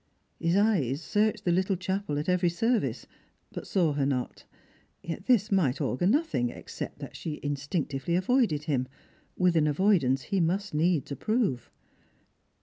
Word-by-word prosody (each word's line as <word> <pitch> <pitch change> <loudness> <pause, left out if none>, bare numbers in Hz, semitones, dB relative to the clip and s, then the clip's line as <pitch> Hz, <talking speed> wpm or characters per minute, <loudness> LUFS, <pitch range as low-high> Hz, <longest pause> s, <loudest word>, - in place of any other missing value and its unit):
His 170 +1 +1
eyes 175 - +2
searched 210 +7 0
the 175 - +3
little 190 +2 +1
chapel 185 -4 -2
at 150 - -3
every 180 -1 +2
service, 225 +7 0 0.5
but - - -7
saw 170 -6 +2
her 140 -1 0
not. 125 -3 -3 0.6
Yet 170 +4 -6
this 225 -5 +3
might 155 -10 +2
augur 140 +3 0
nothing 245 - +1
except - - -7
that - - -9
she 155 -2 -5
instinc 145 +3 -2
tively 145 +5 -1
avoided 185 - +2
him, 135 -5 -1 0.5
with 180 -2 +3
an 155 -2 +3
avoidance 150 -5 +2
he 200 -2 -1
must 190 +3 0
needs 160 -2 +1
approve. 215 - -1
170 Hz, 150 wpm, -28 LUFS, 145-200 Hz, 0.6 s, the